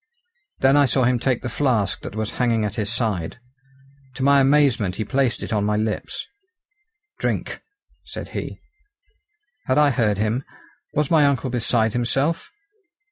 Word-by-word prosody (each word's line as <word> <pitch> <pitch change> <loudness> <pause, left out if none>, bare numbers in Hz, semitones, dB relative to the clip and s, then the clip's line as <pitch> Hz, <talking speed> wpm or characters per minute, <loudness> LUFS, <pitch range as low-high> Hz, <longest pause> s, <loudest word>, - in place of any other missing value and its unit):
Then 135 +2 +5
I 145 -1 +5
saw 130 +1 +1
him 125 0 +2
take 125 -1 0
the - - -2
flask 120 -5 0
that - - -8
was 110 -1 -2
hanging 115 -3 +2
at 105 - -3
his 105 -1 -2
side. 110 -5 -2 0.8
To 130 - -3
my 140 +1 +5
amazement 135 -9 +3
he 110 - -3
placed 130 +3 0
it - - -4
on 105 -1 +1
my 105 0 +1
lips. 110 0 -3 0.9
"Drink!" - - -2 0.4
said - - -8
he. - - -6 1.1
Had 130 - +2
I 150 -1 +5
heard 110 -5 +1
him? 110 +5 0 0.5
Was 150 +1 0
my 155 -3 +5
uncle 135 -2 0
beside 115 -2 +1
himself? 135 +7 0
120 Hz, 155 wpm, -22 LUFS, 110-135 Hz, 1.1 s, Then